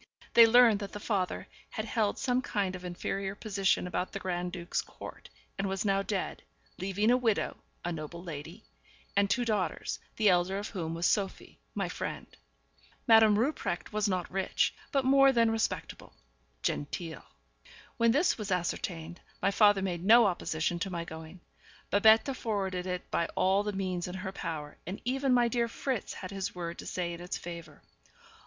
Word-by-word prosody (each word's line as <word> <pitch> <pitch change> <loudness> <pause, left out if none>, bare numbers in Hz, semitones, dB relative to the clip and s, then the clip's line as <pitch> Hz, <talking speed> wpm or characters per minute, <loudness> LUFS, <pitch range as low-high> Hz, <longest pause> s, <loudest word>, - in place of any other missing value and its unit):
They 230 -1 +9
learned 230 -2 +6
that 200 -1 -6
the 205 - -5
father 195 -4 -1 0.2
had 215 - -4
held 215 -3 0
some 250 -1 +1
kind 200 -6 -1
of 180 - -9
inferior 195 +2 -3
position 200 -4 +1
about 180 0 -3
the 195 - -3
Grand 180 -1 -2
duke's 175 -1 -2
court, - - -11 0.3
and 195 0 0
was 195 +2 -2
now 195 -1 +2
dead, 195 -1 -3 0.4
leaving 195 +4 +1
a 250 - +5
widow, 230 -4 0 0.3
a 175 - -1
noble 165 +1 -6
lady, 165 +5 -8 0.5
and 200 0 +3
two 240 +5 +1
daughters, 210 -5 -1 0.2
the 215 - +2
elder 180 +1 +3
of 205 +1 -4
whom 165 -5 -4
was 170 +1 -1
Sophie, 195 0 -1 0.2
my - - -1
friend. - - -5 0.8
Madame 220 -3 +7
Rupprecht 230 - -1
was 210 0 +1
not 185 -2 -2
rich, 190 0 +1 0.2
but 275 -3 +1
more 275 0 +6
than 230 -3 +3
respectable 225 0 -3 0.5
genteel. 160 +1 -3 0.8
When 230 0 +4
this 295 +2 +2
was 210 -1 -4
ascertained, 175 -2 -2 0.2
my 195 - +2
father 205 -1 +5
made 175 -3 -2
no 230 +4 +7
opposition 170 -2 -1
to 195 - -2
my 170 -2 -4
going; 160 +2 -10 0.5
Babette 220 +6 +5
forwarded 190 -6 -2
it 180 -1 -4
by 170 - +1
all 190 +2 +3
the 210 0 -2
means 185 -3 -2
in 180 - -6
her 190 0 -4
power, 160 -6 -6
and 190 +3 -4
even 265 +2 +1
my 245 -1 +5
dear 235 0 +1
Fritz 250 0 -3
had 185 - -7
his 195 -2 -4
word 170 -1 -5
to - - -7
say 175 -1 -2
in 170 - -8
its 180 - -4
favour. 170 -3 -9
195 Hz, 175 wpm, -30 LUFS, 175-220 Hz, 0.8 s, They